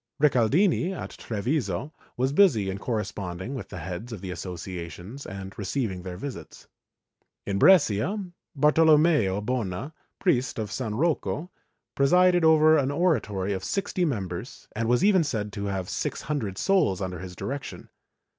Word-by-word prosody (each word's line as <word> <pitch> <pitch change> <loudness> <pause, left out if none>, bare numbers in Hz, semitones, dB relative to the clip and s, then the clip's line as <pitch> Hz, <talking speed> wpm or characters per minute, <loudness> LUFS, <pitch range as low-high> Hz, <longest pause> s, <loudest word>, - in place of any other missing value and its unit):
Ricaldini, 150 - +3
at - - -6
Treviso, 120 - -2 0.2
was 130 +2 +1
busy 120 - +4
in 95 - -5
corresponding 100 -1 -4
with 130 - -6
the - - -7
heads 90 +8 -6
of 110 - -6
the 95 0 -6
associa 90 0 -6
tions 100 - -9
and 95 -1 -7
receiving 100 -2 -2
their 90 -1 -7
visits. 135 +6 -8 0.8
In 100 -1 -1
Brescia, 165 - +4 0.4
Bartolommeo 150 - +4
Bona, 120 - -3 0.2
priest 130 -9 +1
of 110 -2 -3
S. 110 - -4
Rocco, 160 - -1 0.4
presided 180 +5 +4
over 155 -1 +6
an 135 -1 0
oratory 110 - 0
of 95 - -4
sixty 195 -2 -1
members 95 - -4
and 115 +1 -1
was 125 +8 +3
even 195 -4 +5
said 105 -8 -3
to 100 0 -4
have 95 -2 -3
six - - -3
hundred 120 -11 -3
souls 185 - +2
under 90 -2 -4
his 90 0 -8
direction. 140 +8 -6
115 Hz, 145 wpm, -26 LUFS, 95-150 Hz, 0.8 s, over